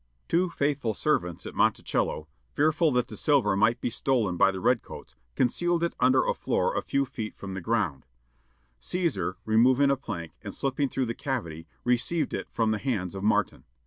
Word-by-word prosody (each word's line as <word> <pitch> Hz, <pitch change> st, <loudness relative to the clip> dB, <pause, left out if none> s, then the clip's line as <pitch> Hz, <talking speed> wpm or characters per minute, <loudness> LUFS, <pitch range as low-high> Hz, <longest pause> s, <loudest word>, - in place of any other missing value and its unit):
Two 175 Hz, +2 st, +2 dB
faithful 140 Hz, -8 st, -1 dB
servants 90 Hz, -, 0 dB
at -, -, -7 dB
Monticello, 75 Hz, -, 0 dB, 0.3 s
fearful 155 Hz, +2 st, +3 dB
that 125 Hz, -1 st, +1 dB
the -, -, -9 dB
silver 135 Hz, -10 st, +2 dB
might 115 Hz, +4 st, +3 dB
be 120 Hz, -, -2 dB
stolen 115 Hz, -8 st, +1 dB
by 90 Hz, -, +5 dB
the 95 Hz, -1 st, -3 dB
red 120 Hz, +5 st, +2 dB
coats, -, -, -11 dB, 0.2 s
concealed 170 Hz, +7 st, +1 dB
it 170 Hz, -, 0 dB
under 130 Hz, +1 st, +4 dB
a -, -, +1 dB
floor -, -, 0 dB
a -, -, +1 dB
few 140 Hz, 0 st, 0 dB
feet 110 Hz, -3 st, -6 dB
from 95 Hz, -1 st, -7 dB
the 95 Hz, -, -5 dB
ground; 90 Hz, -, -1 dB, 0.7 s
Cæsar, 165 Hz, -, -1 dB
removing 130 Hz, +5 st, +4 dB
a -, -, +3 dB
plank, 95 Hz, -11 st, -6 dB
and -, -, -7 dB
slipping 135 Hz, 0 st, -1 dB
through 130 Hz, 0 st, -1 dB
the 115 Hz, -, -3 dB
cavity, 85 Hz, -, -4 dB, 0.2 s
received 125 Hz, +7 st, 0 dB
it -, -, -3 dB
from 115 Hz, -2 st, 0 dB
the 110 Hz, -, -1 dB
hands 100 Hz, -8 st, -2 dB
of 95 Hz, -, -6 dB
Martin. 105 Hz, -1 st, +1 dB
120 Hz, 185 wpm, -27 LUFS, 100-140 Hz, 0.7 s, by